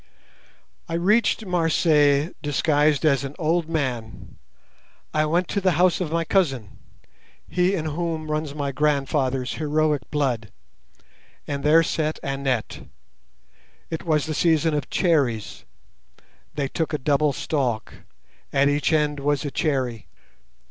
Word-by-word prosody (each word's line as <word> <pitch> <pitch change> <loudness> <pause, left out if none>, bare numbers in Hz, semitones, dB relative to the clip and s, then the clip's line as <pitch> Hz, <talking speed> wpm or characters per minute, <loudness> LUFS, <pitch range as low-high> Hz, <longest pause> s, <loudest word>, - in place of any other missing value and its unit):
"I 165 - -2
reached 210 +5 +2
Marseilles 160 -4 +2
disguised 150 0 +2
as 140 -3 +3
an 140 +1 -6
old 165 0 0
man. 125 -8 -4 0.7
I 155 0 +2
went 175 +3 +1
to 200 - -1
the 185 -2 +2
house 180 +2 +3
of 165 -4 -2
my 165 0 0
cousin—he 180 - -2
in 160 -4 -3
whom 160 0 -3
runs 150 -1 -2
my 140 -2 -2
grandfather's 135 -2 0
heroic 150 -3 0
blood—and 140 +1 -6
there 160 +3 +5
sat 155 -1 -1
Annette. 135 -4 -2 1.0
It 160 - -4
was 155 -3 +1
the 160 - -3
season 160 0 +2
of 145 -1 -2
cherries. 140 - 0 0.9
They 140 -2 -1
took 160 +3 -3
a - - +1
double 145 +1 +2
stalk. 125 -6 -2 0.6
At 140 +1 +3
each 145 +1 +1
end 150 -2 +1
was 145 +1 0
a 145 - -3
cherry. 130 -8 -1
150 Hz, 125 wpm, -23 LUFS, 140-160 Hz, 1.0 s, there